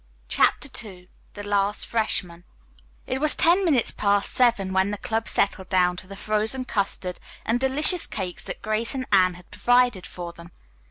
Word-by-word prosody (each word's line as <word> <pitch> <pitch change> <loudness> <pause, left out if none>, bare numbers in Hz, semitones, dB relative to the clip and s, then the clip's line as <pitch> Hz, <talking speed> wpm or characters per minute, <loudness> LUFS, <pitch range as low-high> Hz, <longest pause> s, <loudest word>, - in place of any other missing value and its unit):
CHAPTER - - +2 0.2
II 180 -4 -13 0.3
THE 205 - -7
LAST 205 0 0
FRESHMAN 180 -6 -1 0.6
It 260 +1 -3
was 305 -1 +5
ten 350 +4 +3
minutes 285 -10 +2
past 200 -1 0
seven 230 -7 +2
when 190 +1 +2
the 210 - -3
club 225 +2 -3
settled 190 -1 0
down 180 -1 +2
to 185 - -8
the 195 - -9
frozen 215 +5 -2
custard 195 -5 -3 0.3
and 230 +2 +1
delicious 295 +7 +4
cakes 185 -4 -5
that - - -7
Grace 215 +4 -1
and 260 -1 -3
Anne 185 -2 +4
had 180 0 -16
provided 245 -5 +2
for 175 -1 -7
them. 170 0 -13
205 Hz, 170 wpm, -24 LUFS, 185-245 Hz, 0.6 s, was